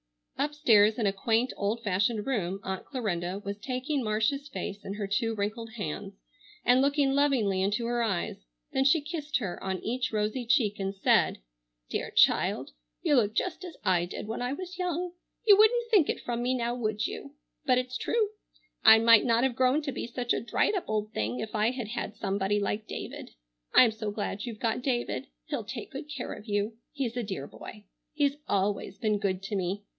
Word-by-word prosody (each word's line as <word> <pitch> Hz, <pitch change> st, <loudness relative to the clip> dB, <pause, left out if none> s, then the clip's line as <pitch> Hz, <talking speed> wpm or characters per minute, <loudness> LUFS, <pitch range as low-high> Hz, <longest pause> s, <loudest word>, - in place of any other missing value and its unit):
Upstairs 235 Hz, -8 st, +4 dB
in 230 Hz, -, 0 dB
a 195 Hz, -, +2 dB
quaint 225 Hz, +5 st, +1 dB
old 215 Hz, +3 st, -1 dB
fashioned 205 Hz, +2 st, +1 dB
room 195 Hz, -8 st, -1 dB
Aunt 190 Hz, 0 st, -4 dB
Clarinda 195 Hz, -8 st, -2 dB
was 200 Hz, +1 st, -4 dB
taking 255 Hz, +4 st, -2 dB
Marcia's 225 Hz, +7 st, 0 dB
face 205 Hz, -6 st, -5 dB
in 195 Hz, -, -5 dB
her 205 Hz, -1 st, -3 dB
two 225 Hz, +3 st, 0 dB
wrinkled 220 Hz, +2 st, -3 dB
hands 200 Hz, -1 st, -5 dB, 0.5 s
and 250 Hz, +1 st, +5 dB
looking 280 Hz, 0 st, +3 dB
lovingly 255 Hz, -10 st, +2 dB
into 205 Hz, +4 st, 0 dB
her 240 Hz, 0 st, 0 dB
eyes; 195 Hz, -, -2 dB, 0.3 s
then 265 Hz, -, +2 dB
she 280 Hz, +4 st, +5 dB
kissed 305 Hz, 0 st, -2 dB
her 195 Hz, -8 st, -5 dB
on 190 Hz, -1 st, -1 dB
each 250 Hz, +3 st, -1 dB
rosy 215 Hz, +4 st, -1 dB
cheek 225 Hz, -5 st, +2 dB
and 195 Hz, 0 st, -2 dB
said: 195 Hz, -, +3 dB, 0.5 s
"Dear -, -, -2 dB
child! -, -, +3 dB, 0.3 s
You 290 Hz, -, +3 dB
look 215 Hz, -2 st, +2 dB
just 370 Hz, 0 st, -1 dB
as 355 Hz, -3 st, -8 dB
I 180 Hz, -2 st, +3 dB
did 175 Hz, -, -6 dB
when 225 Hz, +2 st, -4 dB
I 250 Hz, +2 st, -1 dB
was 370 Hz, +3 st, -7 dB
young. 360 Hz, 0 st, -1 dB, 0.3 s
You 415 Hz, -2 st, +9 dB
wouldn't 465 Hz, +3 st, +4 dB
think 390 Hz, -9 st, +5 dB
it -, -, -1 dB
from 240 Hz, -1 st, -3 dB
me 250 Hz, +1 st, +1 dB
now, 240 Hz, -1 st, -1 dB
would 215 Hz, -3 st, -1 dB
you? 280 Hz, +1 st, -6 dB, 0.3 s
But 255 Hz, -1 st, +5 dB
it's 250 Hz, 0 st, -2 dB
true. 435 Hz, -, +1 dB, 0.5 s
I 220 Hz, 0 st, +10 dB
might 230 Hz, 0 st, +7 dB
not 235 Hz, 0 st, +3 dB
have 265 Hz, -3 st, +1 dB
grown 260 Hz, +5 st, +3 dB
to 285 Hz, -, -2 dB
be 245 Hz, -, -4 dB
such 245 Hz, 0 st, -1 dB
a -, -, -1 dB
dried 235 Hz, -, +1 dB
up 385 Hz, -, -1 dB
old 215 Hz, 0 st, -1 dB
thing 110 Hz, +4 st, -2 dB
if 215 Hz, -, -5 dB
I 215 Hz, +1 st, +2 dB
had 245 Hz, -4 st, -4 dB
had 220 Hz, -2 st, -4 dB
somebody 200 Hz, +1 st, 0 dB
like 205 Hz, +1 st, -2 dB
David. -, -, -7 dB, 0.4 s
I'm 240 Hz, -3 st, +8 dB
so 215 Hz, -1 st, -4 dB
glad 205 Hz, 0 st, -3 dB
you've 225 Hz, -3 st, -6 dB
got 230 Hz, +1 st, 0 dB
David. 240 Hz, -, -1 dB, 0.2 s
He'll -, -, -3 dB
take 230 Hz, +2 st, -7 dB
good 280 Hz, +2 st, -7 dB
care 285 Hz, -4 st, -5 dB
of 210 Hz, -, -11 dB
you. 205 Hz, +2 st, -1 dB
He's 260 Hz, -5 st, -3 dB
a 245 Hz, -, -1 dB
dear 190 Hz, -10 st, -4 dB
boy. 210 Hz, +7 st, -11 dB, 0.3 s
He's 290 Hz, -1 st, +1 dB
always 200 Hz, 0 st, 0 dB
been 210 Hz, -1 st, 0 dB
good 195 Hz, -2 st, -1 dB
to 205 Hz, +1 st, -3 dB
me. 190 Hz, +2 st, -2 dB
230 Hz, 200 wpm, -29 LUFS, 205-265 Hz, 0.5 s, I